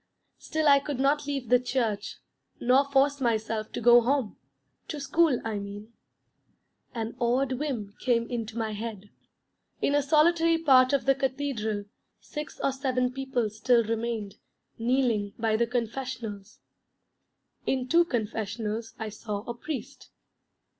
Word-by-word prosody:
Still 315 Hz, -1 st, -1 dB
I 280 Hz, -1 st, +7 dB
could 280 Hz, -2 st, -5 dB
not 285 Hz, +2 st, +2 dB
leave 275 Hz, -4 st, -3 dB
the 250 Hz, 0 st, +6 dB
church 235 Hz, -5 st, -2 dB, 0.4 s
nor 265 Hz, +3 st, +3 dB
force 280 Hz, +1 st, +3 dB
myself 220 Hz, -2 st, -1 dB
to -, -, -3 dB
go 240 Hz, +1 st, +7 dB
home 250 Hz, -4 st, 0 dB, 0.5 s
to 300 Hz, -, -5 dB
school, 295 Hz, -1 st, +2 dB
I 215 Hz, -2 st, -2 dB
mean. 205 Hz, +3 st, -8 dB, 1.0 s
An 225 Hz, 0 st, -3 dB
odd 250 Hz, +2 st, +1 dB
whim 255 Hz, -7 st, -3 dB
came 235 Hz, -2 st, +1 dB
into 230 Hz, -2 st, -4 dB
my 220 Hz, -1 st, -1 dB
head. 210 Hz, -1 st, -6 dB, 0.7 s
In 280 Hz, -, +1 dB
a 290 Hz, -, +4 dB
solitary 325 Hz, +3 st, +4 dB
part 260 Hz, -5 st, +5 dB
of 280 Hz, -2 st, +1 dB
the 270 Hz, -, +5 dB
cathedral 260 Hz, -6 st, -2 dB, 0.3 s
six 300 Hz, 0 st, -7 dB
or 275 Hz, -, +3 dB
seven 255 Hz, -2 st, 0 dB
people 265 Hz, -3 st, -1 dB
still 235 Hz, +2 st, +3 dB
remained, 225 Hz, -2 st, -3 dB, 0.4 s
kneeling 230 Hz, -4 st, +1 dB
by 225 Hz, -1 st, +1 dB
the 235 Hz, +1 st, +2 dB
Confessionals. 230 Hz, -4 st, -4 dB, 1.1 s
In 260 Hz, -1 st, 0 dB
two 335 Hz, +6 st, +5 dB
Confessionals 225 Hz, -, -3 dB
I 220 Hz, -1 st, -4 dB
saw 210 Hz, -1 st, -5 dB
a 240 Hz, -, -5 dB
Priest. 280 Hz, +4 st, -7 dB
245 Hz, 140 wpm, -28 LUFS, 220-275 Hz, 1.1 s, I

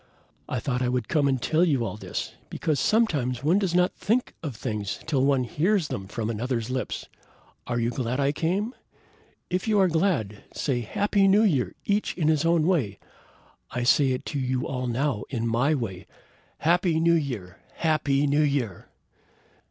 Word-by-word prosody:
I 125 Hz, -, -1 dB
thought 125 Hz, -1 st, -2 dB
I 125 Hz, -, +1 dB
would 125 Hz, -3 st, -1 dB
come 150 Hz, -3 st, +2 dB
and 135 Hz, -2 st, +1 dB
tell 160 Hz, +7 st, +2 dB
you 140 Hz, -9 st, +2 dB
all -, -, -4 dB
this, 95 Hz, -4 st, -5 dB, 0.2 s
because 155 Hz, -4 st, -1 dB
sometimes 135 Hz, -, +1 dB
one 170 Hz, +7 st, +4 dB
does 185 Hz, -4 st, 0 dB
not 180 Hz, 0 st, +3 dB
think 240 Hz, +4 st, 0 dB
of 145 Hz, -7 st, -5 dB
things 105 Hz, -4 st, -3 dB
till 135 Hz, -4 st, +1 dB
one 135 Hz, -2 st, +3 dB
hears 165 Hz, -, +1 dB
them 95 Hz, -1 st, -4 dB
from 110 Hz, +2 st, -3 dB
another's 115 Hz, +1 st, -2 dB
lips. 130 Hz, 0 st, -3 dB, 0.6 s
Are 120 Hz, -1 st, -1 dB
you 115 Hz, +1 st, 0 dB
glad 125 Hz, +1 st, -2 dB
I 140 Hz, 0 st, +2 dB
came? 190 Hz, -, -1 dB, 0.8 s
If 185 Hz, +4 st, -1 dB
you 215 Hz, -2 st, +3 dB
are 190 Hz, -, +5 dB
glad, 160 Hz, -, 0 dB
say 130 Hz, -4 st, 0 dB
Happy 200 Hz, -, +1 dB
New 200 Hz, +3 st, +5 dB
Year! 145 Hz, -, +1 dB
each 205 Hz, -2 st, 0 dB
in 155 Hz, -3 st, +2 dB
his 155 Hz, 0 st, +2 dB
own 165 Hz, -2 st, +3 dB
way! 140 Hz, -, +1 dB, 0.7 s
I 125 Hz, -, -3 dB
say 135 Hz, +2 st, +4 dB
it 125 Hz, -, -4 dB
to 145 Hz, -, -1 dB
you 130 Hz, -1 st, -1 dB
all 130 Hz, -2 st, -3 dB
now 125 Hz, -2 st, 0 dB
in 115 Hz, -4 st, -2 dB
my 120 Hz, +7 st, +2 dB
way. 100 Hz, -9 st, -5 dB, 0.5 s
Happy 170 Hz, 0 st, +2 dB
New 170 Hz, +1 st, +4 dB
Year! 120 Hz, -, -2 dB, 0.2 s
Happy 150 Hz, -3 st, +1 dB
New 145 Hz, +1 st, +3 dB
Year!" 140 Hz, -10 st, -1 dB
140 Hz, 180 wpm, -26 LUFS, 120-170 Hz, 0.8 s, are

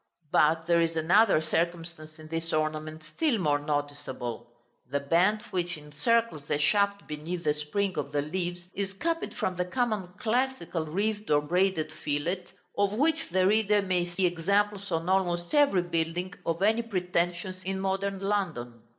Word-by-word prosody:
But 160 Hz, +3 st, +3 dB
there 170 Hz, 0 st, +4 dB
is 165 Hz, 0 st, 0 dB
another 180 Hz, +4 st, +4 dB
circumstance 165 Hz, -1 st, -2 dB
in 155 Hz, 0 st, -11 dB
this 165 Hz, +1 st, -3 dB
ornament 155 Hz, 0 st, -2 dB
still 235 Hz, -, 0 dB
more 150 Hz, -6 st, +2 dB
noticeable. 145 Hz, -5 st, -4 dB, 0.4 s
The 140 Hz, +2 st, 0 dB
band 180 Hz, +9 st, +2 dB
which 180 Hz, -2 st, -2 dB
encircles 150 Hz, +4 st, 0 dB
the 145 Hz, -, 0 dB
shaft 200 Hz, +6 st, +2 dB
beneath 160 Hz, +4 st, -5 dB
the 150 Hz, -2 st, +2 dB
spring 185 Hz, +6 st, -2 dB
of 140 Hz, -1 st, -4 dB
the 145 Hz, 0 st, 0 dB
leaves 175 Hz, +2 st, -4 dB
is 195 Hz, -1 st, -3 dB
copied 330 Hz, +10 st, -2 dB
from 185 Hz, -1 st, -2 dB
the 180 Hz, -, 0 dB
common 215 Hz, -1 st, -1 dB
classical 235 Hz, -9 st, -1 dB
wreathed 210 Hz, +6 st, -1 dB
or 145 Hz, -1 st, +4 dB
braided 175 Hz, -1 st, +1 dB
fillet, 155 Hz, +4 st, -2 dB, 0.3 s
of 200 Hz, 0 st, +1 dB
which 315 Hz, +7 st, +1 dB
the 185 Hz, 0 st, +2 dB
reader 210 Hz, 0 st, +3 dB
may 180 Hz, -2 st, 0 dB
see 175 Hz, +2 st, 0 dB
examples 200 Hz, +3 st, +1 dB
on 165 Hz, +1 st, -1 dB
almost 175 Hz, -2 st, +1 dB
every 280 Hz, -12 st, +4 dB
building 175 Hz, +2 st, -2 dB
of 165 Hz, +3 st, 0 dB
any 220 Hz, +3 st, +4 dB
pretensions 180 Hz, -3 st, -2 dB
in 190 Hz, +1 st, -2 dB
modern 195 Hz, 0 st, -1 dB
London. 165 Hz, -, -2 dB
175 Hz, 160 wpm, -28 LUFS, 155-200 Hz, 0.4 s, there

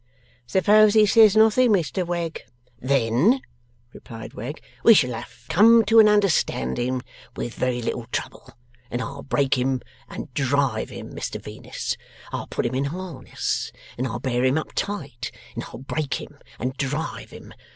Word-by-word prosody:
'Suppose 210 Hz, -, +5 dB
he 215 Hz, -1 st, +7 dB
says 215 Hz, -1 st, +6 dB
nothing, 220 Hz, +3 st, +5 dB
Mr 185 Hz, -1 st, +1 dB
Wegg?' 170 Hz, -2 st, -3 dB, 0.4 s
'Then,' 135 Hz, -, +2 dB, 0.5 s
replied 115 Hz, -2 st, -10 dB
Wegg, 130 Hz, +8 st, -6 dB, 0.2 s
'we 230 Hz, -, +8 dB
shall 125 Hz, -8 st, +3 dB
have 120 Hz, +1 st, -9 dB
come 225 Hz, +4 st, +6 dB
to 225 Hz, +2 st, +6 dB
an 215 Hz, -1 st, +8 dB
understanding 130 Hz, -, +1 dB, 0.3 s
with 120 Hz, -, -4 dB
very 125 Hz, -1 st, -1 dB
little 115 Hz, 0 st, -3 dB
trouble, -, -, -5 dB, 0.4 s
and 120 Hz, -, -3 dB
I'll 140 Hz, +4 st, -5 dB
break 135 Hz, -2 st, +1 dB
him 130 Hz, +1 st, +1 dB, 0.3 s
and -, -, -8 dB
drive 135 Hz, -4 st, 0 dB
him, -, -, -9 dB
Mr -, -, -4 dB
Venus. -, -, -5 dB, 0.3 s
I'll -, -, -4 dB
put -, -, -2 dB
him 120 Hz, -, -1 dB
in 135 Hz, +2 st, 0 dB
harness, 170 Hz, 0 st, -4 dB, 0.2 s
and 130 Hz, +2 st, -2 dB
I'll 120 Hz, 0 st, -4 dB
bear 125 Hz, -1 st, -1 dB
him 130 Hz, +3 st, +3 dB
up 155 Hz, -, -3 dB
tight, 140 Hz, -11 st, -4 dB, 0.2 s
and -, -, -5 dB
I'll -, -, -10 dB
break 140 Hz, +2 st, -3 dB
him 145 Hz, -1 st, -9 dB, 0.2 s
and 130 Hz, +2 st, -3 dB
drive 145 Hz, +4 st, -3 dB
him. -, -, -12 dB
140 Hz, 160 wpm, -24 LUFS, 125-200 Hz, 0.5 s, we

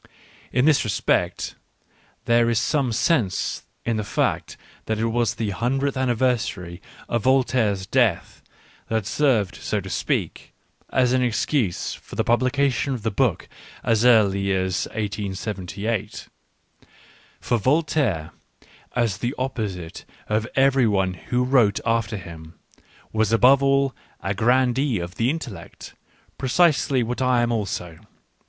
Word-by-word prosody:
In 125 Hz, +2 st, +2 dB
this 155 Hz, -2 st, +4 dB
respect 110 Hz, -4 st, 0 dB, 0.7 s
there 115 Hz, 0 st, +3 dB
is 115 Hz, -, +1 dB
some 140 Hz, 0 st, +1 dB
sense 120 Hz, -, 0 dB, 0.2 s
in 115 Hz, -1 st, 0 dB
the 105 Hz, -, -2 dB
fact 100 Hz, -, -1 dB, 0.3 s
that 110 Hz, -, -1 dB
it 110 Hz, -, 0 dB
was 115 Hz, -1 st, 0 dB
the 110 Hz, -3 st, -2 dB
hundredth 135 Hz, +7 st, -1 dB
anniversary 120 Hz, -9 st, -1 dB, 0.3 s
of 120 Hz, -, -1 dB
Voltaire's 125 Hz, -6 st, +2 dB
death -, -, 0 dB, 0.5 s
that 110 Hz, -3 st, -1 dB
served, 110 Hz, -4 st, +1 dB
so 105 Hz, -, -2 dB
to 95 Hz, -1 st, -7 dB
speak, -, -, -2 dB, 0.3 s
as 125 Hz, -1 st, +2 dB
an 130 Hz, -, +2 dB
excuse 120 Hz, -, 0 dB
for -, -, -11 dB
the -, -, +1 dB
publication 130 Hz, +2 st, +1 dB
of 115 Hz, -, -8 dB
the 110 Hz, -, 0 dB
book 100 Hz, -, 0 dB, 0.4 s
as 115 Hz, -2 st, +2 dB
early 100 Hz, -5 st, +4 dB
as 95 Hz, -1 st, -1 dB
1878. 105 Hz, 0 st, -4 dB, 1.1 s
For 120 Hz, -2 st, 0 dB
Vol 145 Hz, +10 st, +3 dB
taire, 100 Hz, -, -1 dB, 0.6 s
as 115 Hz, -6 st, 0 dB
the 120 Hz, +6 st, -2 dB
opposite 105 Hz, -10 st, -4 dB, 0.2 s
of 110 Hz, +1 st, 0 dB
every 135 Hz, -2 st, +4 dB
one 95 Hz, -3 st, +1 dB
who 125 Hz, +7 st, -2 dB
wrote 125 Hz, -6 st, +3 dB
after 115 Hz, -2 st, 0 dB
him, 85 Hz, -2 st, -11 dB, 0.6 s
was 110 Hz, -1 st, +1 dB
above 125 Hz, +4 st, +5 dB
all 135 Hz, -1 st, +2 dB, 0.3 s
a 95 Hz, -, -2 dB
grandee 125 Hz, +3 st, +2 dB
of 85 Hz, 0 st, -5 dB
the 115 Hz, +2 st, +2 dB
intellect: 120 Hz, -, -7 dB, 0.5 s
pre 130 Hz, -, -2 dB
cisely 140 Hz, -4 st, +3 dB
what 120 Hz, +3 st, -3 dB
I 125 Hz, -2 st, +3 dB
am 120 Hz, -, 0 dB
also. 90 Hz, -7 st, -3 dB
115 Hz, 135 wpm, -23 LUFS, 100-130 Hz, 1.1 s, above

